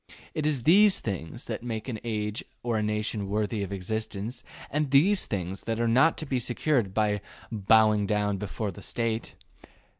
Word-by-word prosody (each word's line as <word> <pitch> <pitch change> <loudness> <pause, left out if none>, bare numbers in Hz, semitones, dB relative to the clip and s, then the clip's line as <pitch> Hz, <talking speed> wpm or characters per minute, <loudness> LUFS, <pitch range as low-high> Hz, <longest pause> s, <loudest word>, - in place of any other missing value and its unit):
It 155 -1 -1
is 140 -6 0
these 195 - +6
things 100 +3 -5
that 110 -2 -4
make 115 -1 -4
an 115 -4 -4
age 105 -2 -2 0.2
or 120 -1 0
a 110 - +1
nation 105 -1 -1
worthy 105 +1 -1
of 100 -1 -4
existence, 110 +4 -4 0.3
and 150 0 0
these 180 +9 +4
things 95 -2 -4
are 115 +1 +1
not 130 +8 +4
to 155 - -4
be 135 -3 0
secured 120 -2 +1
by 105 0 +1 0.3
bowing 110 -1 +4
down 105 -1 +1
before 105 +1 -3
the - - -11
State. 115 -1 -2
110 Hz, 170 wpm, -27 LUFS, 105-125 Hz, 0.3 s, these